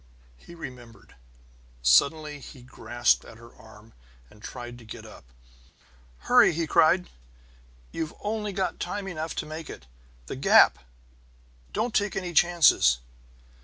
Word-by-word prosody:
He 170 Hz, -, -15 dB
remembered. 120 Hz, -, -11 dB, 0.7 s
Suddenly 145 Hz, -, +3 dB
he 130 Hz, -2 st, -13 dB
grasped 120 Hz, -1 st, 0 dB
at 110 Hz, -, -14 dB
her 115 Hz, +1 st, -16 dB
arm 110 Hz, 0 st, -17 dB, 0.4 s
and 105 Hz, -, -19 dB
tried 120 Hz, +1 st, -9 dB
to -, -, -14 dB
get 110 Hz, -, -10 dB
up. -, -, -14 dB, 1.0 s
"Hurry!" -, -, +5 dB
he 165 Hz, +1 st, -1 dB
cried. 165 Hz, +3 st, +3 dB, 0.8 s
"You've 160 Hz, -1 st, -5 dB
only 210 Hz, 0 st, -3 dB
got 190 Hz, -1 st, -3 dB
time 195 Hz, +2 st, -4 dB
enough 160 Hz, -3 st, -5 dB
to -, -, -3 dB
make 155 Hz, +1 st, -8 dB
it! -, -, -10 dB, 0.4 s
The -, -, -6 dB
gap 65 Hz, -, +5 dB, 0.9 s
don't 235 Hz, 0 st, -2 dB
take 205 Hz, -1 st, 0 dB
any 180 Hz, -2 st, -4 dB
chances!" 165 Hz, -, +4 dB
150 Hz, 130 wpm, -26 LUFS, 115-175 Hz, 1.0 s, Hurry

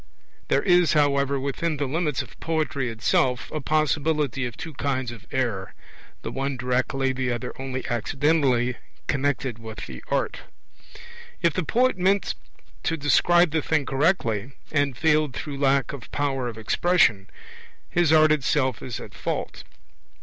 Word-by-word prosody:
There -, -, +2 dB
is, 175 Hz, -3 st, +4 dB
however, 140 Hz, -2 st, +2 dB
within 145 Hz, +4 st, -2 dB
the 145 Hz, -, -1 dB
limits 150 Hz, 0 st, -1 dB
of -, -, -17 dB
poetry 155 Hz, -5 st, -1 dB
itself 120 Hz, +3 st, 0 dB
a 155 Hz, -, -3 dB
possibility 150 Hz, -3 st, +1 dB
of 120 Hz, -, -10 dB
two 165 Hz, -2 st, -7 dB
kinds 130 Hz, -3 st, -2 dB
of 115 Hz, -3 st, -12 dB
error, 115 Hz, -8 st, -2 dB, 0.5 s
the -, -, -4 dB
one 135 Hz, 0 st, -2 dB
directly, 130 Hz, +2 st, 0 dB
the 130 Hz, -1 st, -1 dB
other 120 Hz, +1 st, -4 dB
only 130 Hz, -1 st, -4 dB
accidentally 125 Hz, 0 st, +1 dB, 0.3 s
connected 135 Hz, -4 st, -1 dB
with 110 Hz, -1 st, -7 dB
the 65 Hz, -2 st, -9 dB
art. -, -, -1 dB, 1.0 s
If 170 Hz, -2 st, +4 dB
the 185 Hz, -, 0 dB
poet 240 Hz, +4 st, +1 dB
meant 195 Hz, +2 st, +2 dB, 0.5 s
to 165 Hz, -, -1 dB
describe 175 Hz, +3 st, +4 dB
the 160 Hz, 0 st, +1 dB
thing 155 Hz, -2 st, 0 dB
correctly, 135 Hz, -, 0 dB, 0.2 s
and 145 Hz, -4 st, +1 dB
failed 155 Hz, -3 st, +2 dB
through 140 Hz, -2 st, -5 dB
lack 135 Hz, -2 st, +2 dB
of 135 Hz, -5 st, -9 dB
power 135 Hz, -3 st, -1 dB
of 115 Hz, -2 st, -6 dB
expression, 115 Hz, -, +2 dB, 0.6 s
his 175 Hz, -3 st, +2 dB
art 155 Hz, -1 st, +6 dB
itself 130 Hz, -4 st, +1 dB
is 125 Hz, -4 st, -5 dB
at -, -, -10 dB
fault. -, -, -4 dB
140 Hz, 150 wpm, -25 LUFS, 125-155 Hz, 1.0 s, art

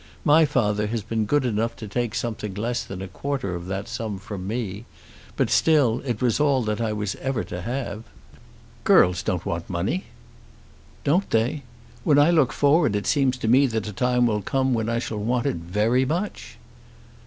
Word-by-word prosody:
My 155 Hz, +2 st, +6 dB
father 105 Hz, -7 st, +1 dB
has 110 Hz, 0 st, -3 dB
been 110 Hz, 0 st, -2 dB
good 145 Hz, +1 st, +2 dB
enough 115 Hz, 0 st, -1 dB
to 110 Hz, -, -8 dB
take 120 Hz, +2 st, -2 dB
something 105 Hz, -4 st, -3 dB
less 120 Hz, +4 st, -2 dB
than 95 Hz, 0 st, -7 dB
a -, -, -6 dB
quarter 130 Hz, 0 st, -3 dB
of 85 Hz, 0 st, -6 dB
that 95 Hz, +1 st, -4 dB
sum 115 Hz, -4 st, -4 dB
from 95 Hz, -1 st, -7 dB
me; 110 Hz, -1 st, -4 dB, 0.5 s
but -, -, +1 dB
still 140 Hz, -8 st, +3 dB
it 120 Hz, -4 st, -3 dB
was 120 Hz, +1 st, +2 dB
all 140 Hz, -4 st, +3 dB
that 105 Hz, +1 st, -2 dB
I 110 Hz, -2 st, 0 dB
was 105 Hz, -2 st, -2 dB
ever 130 Hz, -4 st, -2 dB
to 90 Hz, -, -6 dB
have." 115 Hz, -1 st, -4 dB, 0.8 s
"Girls 90 Hz, 0 st, +5 dB
don't 90 Hz, -2 st, -2 dB
want 85 Hz, 0 st, -3 dB
money." 95 Hz, -, -2 dB, 1.0 s
"Don't 175 Hz, +8 st, +1 dB
they? 115 Hz, +6 st, +1 dB, 0.4 s
When 145 Hz, +1 st, +4 dB
I 145 Hz, +4 st, +6 dB
look 155 Hz, -7 st, +3 dB
forward 145 Hz, -5 st, +3 dB
it 105 Hz, -, -2 dB
seems 135 Hz, -3 st, +2 dB
to 120 Hz, -, -3 dB
me 130 Hz, +4 st, +5 dB
that 110 Hz, -3 st, -2 dB
a 105 Hz, -, -5 dB
time 125 Hz, +3 st, +2 dB
will 105 Hz, -3 st, +1 dB
come 130 Hz, +5 st, 0 dB
when 110 Hz, -1 st, -1 dB
I 115 Hz, -, 0 dB
shall 110 Hz, -2 st, -3 dB
want 120 Hz, +3 st, 0 dB
it -, -, 0 dB
very 105 Hz, +9 st, +1 dB
much." 175 Hz, +9 st, -4 dB
115 Hz, 190 wpm, -24 LUFS, 105-130 Hz, 1.0 s, My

